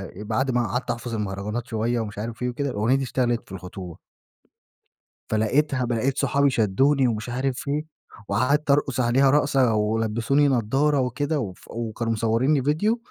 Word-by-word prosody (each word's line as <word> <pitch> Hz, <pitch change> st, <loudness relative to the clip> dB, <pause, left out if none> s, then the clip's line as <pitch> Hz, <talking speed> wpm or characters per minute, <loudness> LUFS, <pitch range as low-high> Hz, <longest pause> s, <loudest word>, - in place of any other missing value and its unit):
بعد 110 Hz, +6 st, -1 dB
ما 120 Hz, -2 st, +1 dB
قعدت 125 Hz, 0 st, -2 dB
أحفظ 120 Hz, 0 st, -5 dB
المهرجانات 105 Hz, +3 st, -3 dB
شوية، 115 Hz, +1 st, -1 dB
ومش 105 Hz, -2 st, -5 dB
عارف 115 Hz, +3 st, -5 dB
إيه 125 Hz, -, 0 dB
وكده، 140 Hz, +3 st, -2 dB
الأغنية 115 Hz, +4 st, +1 dB
دي 135 Hz, -, 0 dB
اشتغلت 120 Hz, -2 st, 0 dB
في -, -, -18 dB
الخطوبة 90 Hz, -2 st, -8 dB, 1.3 s
فلقيتها 130 Hz, +5 st, +1 dB
ب 120 Hz, -, -1 dB
لقيت 130 Hz, +4 st, 0 dB
صحابي 140 Hz, +1 st, +2 dB
شدّوني 130 Hz, +5 st, +2 dB
ومش 110 Hz, +1 st, -3 dB
عارف 135 Hz, +2 st, -2 dB
إيه، 150 Hz, +2 st, -1 dB, 0.4 s
وقعدت 140 Hz, +8 st, +1 dB
أرقص 140 Hz, -2 st, +1 dB
عليها 130 Hz, +3 st, +4 dB
رقصة، 135 Hz, -5 st, +3 dB
ولبسوني 110 Hz, +6 st, +1 dB
نظارة 135 Hz, +4 st, +2 dB
وكده 145 Hz, +4 st, -1 dB
وف 95 Hz, -7 st, -6 dB
وكانوا 115 Hz, 0 st, -3 dB
مصورينّي 115 Hz, +6 st, +2 dB
ڤيديو، 165 Hz, -, +1 dB
120 Hz, 155 wpm, -24 LUFS, 110-140 Hz, 1.3 s, عليها